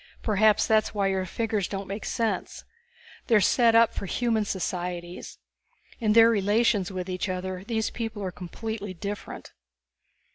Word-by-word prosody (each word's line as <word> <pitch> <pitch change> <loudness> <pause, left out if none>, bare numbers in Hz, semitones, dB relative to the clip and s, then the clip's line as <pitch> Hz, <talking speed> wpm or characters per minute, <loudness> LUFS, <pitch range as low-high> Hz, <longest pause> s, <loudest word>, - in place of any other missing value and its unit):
Perhaps 215 -1 +3
that's 215 -1 +2
why 200 -1 +1
your 190 -1 -1
figures 215 -1 -1
don't 195 0 -5
make 200 +2 -5
sense. 225 -1 -2 0.6
They 235 - +4
are - - +7
set 230 +3 +4
up 230 0 +5
for 195 - -5
the - - -6
human 225 -3 +1
societies. 180 -2 -4 0.6
In 215 -3 +2
their 230 +1 +7
relations 205 -2 +2
with 185 -1 -4
each 185 +1 -3
other, 185 0 -4
these 220 +1 -2
people 225 -3 -5
are 185 - -3
completely 200 +3 -6
different." 200 +4 -7
205 Hz, 155 wpm, -26 LUFS, 185-225 Hz, 0.6 s, are